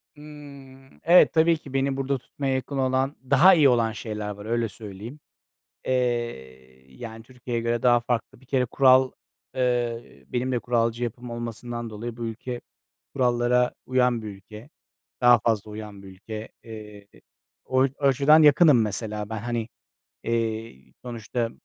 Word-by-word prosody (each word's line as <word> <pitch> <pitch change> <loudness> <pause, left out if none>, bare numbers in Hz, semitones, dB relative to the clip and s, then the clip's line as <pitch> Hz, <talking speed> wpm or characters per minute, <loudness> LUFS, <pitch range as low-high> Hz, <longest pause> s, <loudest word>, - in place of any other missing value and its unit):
Hımm. 140 -3 -14
Evet, 175 +2 +6
tabii 165 +1 +4
ki 140 -3 -13
beni 135 0 0
burada 135 0 -1
tutmaya 135 +2 -4
yakın 130 +2 -3
olan, 130 +2 0
daha 145 +8 +7
iyi 150 -6 +5
olan 115 -2 +2
şeyler 105 -1 -5
var, 105 0 -8
öyle 115 0 -1
söyleyeyim. 110 +6 -10 0.7
Eee, 65 - -3
yani, 115 - -9
Türkiye'ye 120 -1 -5
göre 115 0 -1
daha 120 -1 +5
farklı. 120 0 -3
Bir - - -20
kere 130 -1 +1
kural, 130 +1 +4 0.4
eee, 120 -2 -2
benim 125 +1 -2
de 125 - 0
kuralcı 115 0 0
yapım 120 +1 -5
olmasından 120 0 -6
dolayı, 115 +2 -7
bu 120 - -4
ülke 120 +2 -6 0.5
kurallara 125 -1 +2
uyan 125 -2 +1
bir 110 - -7
ülke. 105 +3 -12 0.5
Daha 120 -1 +6
fazla 110 -2 -1
uyan 105 -2 -9
bir - - -11
ülke. 105 +3 -8
Eee, 105 -2 -11 0.6
o 130 0 +2 0.2
açıdan 140 +3 +5
yakınım 150 -3 +6
mesela 105 0 -3
ben. 110 - -4
Hani, 115 0 -3 0.6
eee, 115 - -2 0.3
sonuçta 115 0 -4
120 Hz, 145 wpm, -25 LUFS, 110-130 Hz, 0.7 s, daha